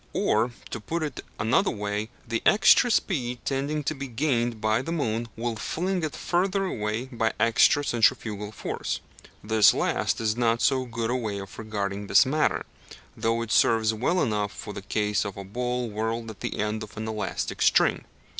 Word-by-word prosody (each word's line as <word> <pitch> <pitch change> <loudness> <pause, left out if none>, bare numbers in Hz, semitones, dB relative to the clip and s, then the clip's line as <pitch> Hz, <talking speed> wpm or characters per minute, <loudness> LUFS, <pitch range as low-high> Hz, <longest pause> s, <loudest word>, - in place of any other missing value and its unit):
Or, 110 +3 +2 0.2
to - - -4
put 160 +9 -3
it 145 -5 -5
another 115 - +2
way, 105 +1 -3 0.2
the 115 0 -1
extra 215 +3 +6
speed 130 - 0
tending 145 +2 -1
to 155 - -1
be 140 -2 -6
gained 120 -3 0
by 110 +2 +1
the 165 - -5
moon 120 -8 -1
will 115 0 -2
fling 180 - -2
it 155 - -3
further 195 +2 0
away 110 - -2
by 115 -4 -1
extra 115 +5 +4
centrifugal 110 -4 +1
force. 110 - -4 0.4
This 110 -1 +5
last - - 0
is 110 -1 0
not 115 -1 +2
so 130 0 +2
good 115 -1 -3
a - - +1
way 110 -5 -2
of 95 -2 -8
regarding 100 -2 -3
the 100 +1 +6
matter; 155 +3 +1 0.5
though 115 +1 0
it 115 - -6
serves 110 0 +4
well 150 +12 +1
enough 105 -3 -1
for 105 - -8
the 100 - -6
case 105 0 0
of 100 -2 -6
a 100 - -6
ball 125 +4 -2
whirled 110 +1 -3
at 105 - -14
the - - -4
end 105 +1 -1
of 105 0 -9
an 110 0 -4
elastic 110 -1 -3
string. - - +4
115 Hz, 185 wpm, -26 LUFS, 105-130 Hz, 0.5 s, extra